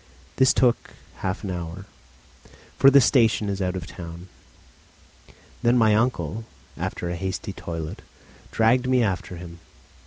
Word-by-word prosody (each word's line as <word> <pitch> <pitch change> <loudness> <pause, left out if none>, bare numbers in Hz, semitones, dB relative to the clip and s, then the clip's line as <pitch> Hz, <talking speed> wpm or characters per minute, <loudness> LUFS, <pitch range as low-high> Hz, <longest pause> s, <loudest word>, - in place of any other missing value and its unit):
This 130 -1 +5
took 125 -2 +1 0.2
half 95 +3 -3
an 100 - -3
hour, 90 +2 -6 0.9
for 135 - +8
the 140 0 +7
station 115 -5 +3
is 100 0 -3
out 90 0 -1
of 90 - -4
the - - -12
town. 85 +1 -9 1.3
Then 120 +1 +3
my 110 -2 +5
uncle, 110 - 0 0.3
after 85 - -4
a - - -3
hasty 95 +3 -4
toilet, 80 -3 -6 0.5
dragged 120 +3 +3
me 130 -2 +4
after 95 -3 -2
him. 85 -1 -10
100 Hz, 145 wpm, -24 LUFS, 85-115 Hz, 1.3 s, for